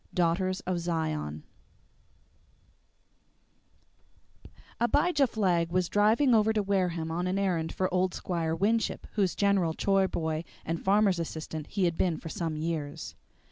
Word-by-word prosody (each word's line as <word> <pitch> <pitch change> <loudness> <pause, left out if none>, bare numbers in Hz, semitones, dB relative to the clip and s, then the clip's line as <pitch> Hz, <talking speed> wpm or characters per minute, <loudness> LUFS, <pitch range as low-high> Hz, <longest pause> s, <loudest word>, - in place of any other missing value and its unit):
DAUGHTERS 185 +2 +1
OF 180 -2 -2
ZION 155 - -2 3.0
I - - -14 0.3
Abijah 290 +4 +3
Flagg 180 -7 +1
was 180 -1 +1
driving 220 +6 +3
over 220 -1 +4
to 210 -1 +1
Wareham 180 -5 0
on 175 +2 -1
an 185 +1 0
errand 175 -5 0
for 185 - 0
old 185 0 +1
Squire 165 -3 -2
Winship, 215 +5 0
whose 195 -4 0
general 195 -5 +2
chore 195 -1 +2
boy 160 -2 -2 0.2
and 165 +1 -2
farmer's 195 -2 +3
assistant 160 -2 -5
he 200 - -2
had 170 -1 -1
been 175 -4 +1
for 160 - -8
some 165 -4 -3
years. 155 -2 -4
180 Hz, 140 wpm, -29 LUFS, 165-200 Hz, 3.0 s, over